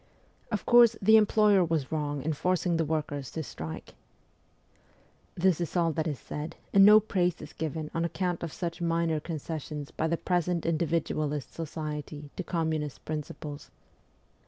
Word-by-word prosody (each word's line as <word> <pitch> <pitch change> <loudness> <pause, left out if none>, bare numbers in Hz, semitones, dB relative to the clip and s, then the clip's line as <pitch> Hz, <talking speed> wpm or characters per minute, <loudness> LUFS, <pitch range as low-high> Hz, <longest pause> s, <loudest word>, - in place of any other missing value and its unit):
' - - -36
Of 210 - -2
course, 240 -2 +7
the 220 +3 +6
employer 210 -2 +5
was 160 -5 -1
wrong 145 -3 -2
in 160 +1 0
forcing 175 +2 0
the 165 - +2
workers 145 -3 -2
to 160 - -3
strike,' 80 - -7 1.4
This 180 -1 +2
is 170 - -3
all 165 -1 +3
that 160 +1 -2
is 150 -4 -2
said, 150 +5 -6 0.2
and 195 - +8
no 210 +2 +9
praise 180 -4 0
is 150 - -10
given 155 -1 -4
on 165 - 0
account 175 0 -2
of 170 - -4
such 170 0 -5
minor 165 -2 +1
concessions 150 -2 -5
by 160 - -1
the 170 +1 0
present 175 -1 0
individualist 155 -3 -1
society 150 -2 -6
to 185 - -4
communist 160 -4 -2
principles. 150 -1 -6
160 Hz, 160 wpm, -29 LUFS, 150-175 Hz, 1.4 s, no